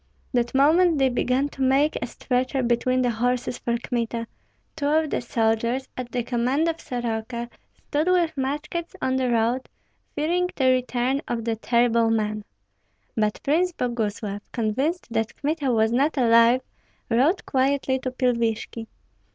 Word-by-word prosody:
That 240 0 0
moment 320 +4 +4
they 270 -1 +3
began 255 +2 +1
to 275 - -9
make 270 +3 +3
a - - -2
stretcher 255 +1 -1
between 255 +2 +1
the 245 - +2
horses 245 +2 -1
for 235 0 -1
Kmita. 235 -1 -3 0.5
Two 290 -3 -2
of 310 0 +2
the - - 0
soldiers, 235 +2 0
at 250 -1 -6
the 245 -1 -1
command 250 +6 0
of 330 0 -2
Soroka, 235 0 -4 0.3
stood 300 +3 -2
with 355 -3 +2
muskets 300 +5 -3
on 260 0 0
the 255 -1 0
road, 235 +2 0 0.5
fearing 350 +4 +1
the 260 -2 +3
return 255 +1 0
of 230 -2 -3
the 230 -1 0
terrible 235 0 +2
man. 215 -1 -1 0.7
But 215 -1 0
Prince 345 +5 +2
Boguslav, 215 -6 -3
convinced 265 +10 -1
that 225 -1 -1
Kmita 290 -2 0
was 220 -1 +2
not 280 +6 +1
alive, 230 0 +5 0.5
rode 275 - +2
quietly 265 0 +1
to 255 - -3
Pilvishki. 235 -3 -1
250 Hz, 150 wpm, -24 LUFS, 235-280 Hz, 0.7 s, alive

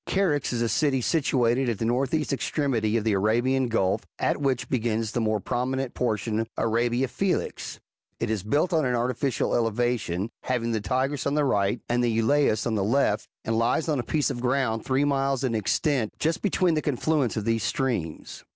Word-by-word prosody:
Charax 165 -8 +1
is 120 -1 0
a - - +1
city 140 +2 +1
situate 125 -3 +1
at 115 - -1
the 115 - -2
furthest 135 +5 0
extremity 120 -6 0
of 110 - -1
the 110 - +1
Arabian 120 +6 +2
Gulf, 100 -5 +1 0.2
at - - 0
which 135 -3 0
begins 115 -3 -1
the 120 - -1
more 110 -1 +1
prominent 130 +4 -2
portion 110 -2 -1
of 115 0 -2
Arabia 120 +3 +1
Felix 195 +8 -2
:^ - - -22 0.4
it 115 -1 -1
is 110 -3 -1
built 145 - 0
on 160 -2 +3
an 125 -2 +1
artificial 125 +1 0
elevation, 115 -4 0
having 115 -2 -1
the 110 -2 -1
Tigris 130 +8 -1
on 140 - 0
the 150 -1 +2
right, 100 -2 +1
and 120 +1 +1
the 120 - +2
Eulaeus 115 0 +2
on 115 - 0
the 105 -3 0
left, 130 +8 +1 0.2
and 115 - 0
lies 120 +8 +1
on 150 -4 +1
a - - -1
piece 150 +4 0
of 120 -3 -5
ground 125 -3 0
three 135 +2 +1
miles 135 -1 0
in 125 -3 0
extent, 115 - 0
just 160 +3 0
between 185 -3 +2
the 155 - +1
con 145 -5 -1
fluence 145 -7 0
of 105 - -2
those 115 -1 +1
streams. 100 - -3
120 Hz, 200 wpm, -26 LUFS, 115-140 Hz, 0.4 s, on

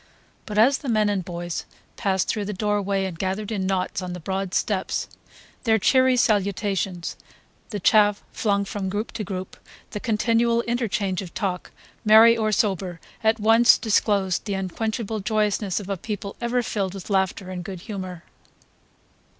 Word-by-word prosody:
But 210 - -4
as 255 +6 +5
the 280 - -5
men 215 -2 +3
and 200 -3 -1
boys 175 -1 -4 0.3
passed 190 -3 0
through 210 -2 -1
the 210 - -3
doorway 200 -1 0
and 175 -3 -6
gathered 195 +3 -2
in 195 -3 -1
knots 190 0 -1
on 180 -1 -5
the 180 - -6
broad 190 +2 -3
steps, 195 -3 -1 0.6
their 225 -2 +4
cheery 260 +4 +4
salutations, 200 -4 0 0.5
the 210 - -4
chaff 205 +1 +4
flung 200 -2 0
from 195 -1 -4
group 205 +4 -3
to 215 - -4
group, 185 -1 -6 0.3
the 210 - -4
continual 230 +1 +2
interchange 215 -6 -1
of 180 -4 -10
talk, 185 -3 -2 0.3
merry 225 +1 +8
or 215 -1 0
sober, 190 -5 0 0.2
at 220 +1 +3
once 225 +3 +6
disclosed 200 -4 +1
the 200 -2 -2
unquenchable 215 +3 -3
joyousness 210 -2 0
of 200 - -8
a 195 -1 -2
people 200 +1 -5
ever 240 +1 0
filled 200 -4 -2
with 195 +1 -8
laughter 190 -1 0
and 180 -1 -5
good 185 -1 -7
humour. 185 -4 -6
205 Hz, 160 wpm, -24 LUFS, 190-220 Hz, 0.6 s, merry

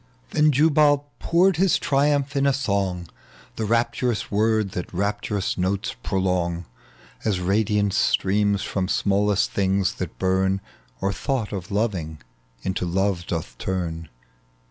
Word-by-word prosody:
Then 150 0 +4
Jubal 145 0 +3
poured 180 +1 +3
his 190 +1 +3
triumph 145 0 +1
in 140 0 +2
a 140 - +3
song 100 -9 -1 0.2
— - - -25
The 110 - -1
rapturous 115 +1 0
word 110 -1 +2
that 90 - -5
rapturous 100 +1 -2
notes 95 +2 -1
prolong 90 -2 -1 0.6
As 105 -4 0
radiance 100 +1 +1
streams 100 +1 +2
tVom 95 -2 -2
smallest 100 0 +1
things 95 -1 +1
that - - -4
bum, 95 +1 +1 0.4
Or 100 - 0
thought 130 -4 -2
of 95 -3 -5
loving 95 -8 -2 0.4
into 90 -1 -2
love 95 0 0
doth 80 -8 -4
turn. 85 -4 -3
100 Hz, 130 wpm, -24 LUFS, 95-115 Hz, 0.6 s, Then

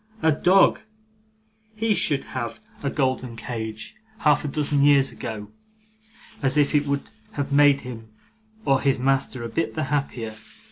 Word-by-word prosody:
A 160 - +5
dog! 180 +6 +4 0.9
He 220 0 +1
should 145 -8 +1
have 115 -3 -5 0.2
had 140 - -1
a - - -12
golden 130 -4 -1
cage 110 -2 -6 0.3
half 150 -1 +3
a - - -2
dozen 145 0 0
years 140 -1 +5
ago, 105 -2 -6 0.9
if 140 +2 +2
it 145 -1 +2
would 140 -1 -2 0.2
have 140 -1 -3
made 145 -1 +5
him 115 -3 -8 0.6
or 135 -2 +3
his 135 -1 +2
master 135 -1 0
a - - -3
bit 165 +8 -2
the 155 - -1
happier. 120 -6 -2
140 Hz, 150 wpm, -24 LUFS, 120-145 Hz, 0.9 s, A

